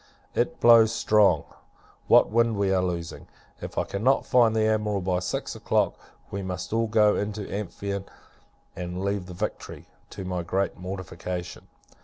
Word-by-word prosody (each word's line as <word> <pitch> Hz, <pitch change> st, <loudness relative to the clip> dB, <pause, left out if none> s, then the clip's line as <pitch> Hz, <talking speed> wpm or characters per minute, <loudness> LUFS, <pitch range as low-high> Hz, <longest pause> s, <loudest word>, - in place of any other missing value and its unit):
It -, -, -1 dB
blows 115 Hz, -2 st, +7 dB
strong. 105 Hz, -8 st, +3 dB, 0.6 s
What -, -, +5 dB
wind 115 Hz, 0 st, +2 dB
we 100 Hz, -1 st, +1 dB
are 95 Hz, -, +2 dB
losing! 85 Hz, -2 st, -4 dB, 0.3 s
If -, -, -8 dB
I -, -, +2 dB
cannot 125 Hz, +8 st, +1 dB
find 115 Hz, -3 st, +4 dB
the 110 Hz, -, +2 dB
Admiral 105 Hz, -2 st, 0 dB
by 90 Hz, 0 st, 0 dB
six 90 Hz, -1 st, -4 dB
o'clock, -, -, +1 dB, 0.4 s
we 100 Hz, -, -3 dB
must 90 Hz, 0 st, -5 dB
all 115 Hz, 0 st, +1 dB
go 105 Hz, -1 st, +4 dB
into 105 Hz, 0 st, -3 dB
the -, -, -8 dB
Amphion, 100 Hz, -1 st, -4 dB, 0.7 s
and 90 Hz, +1 st, -4 dB
leave 100 Hz, -2 st, -2 dB
the 90 Hz, -, -9 dB
Victory, 105 Hz, +4 st, -5 dB, 0.2 s
to 95 Hz, -, -7 dB
my 90 Hz, -1 st, -2 dB
great 95 Hz, +3 st, -1 dB
mortification. 90 Hz, -1 st, -6 dB
100 Hz, 160 wpm, -26 LUFS, 90-110 Hz, 0.7 s, blows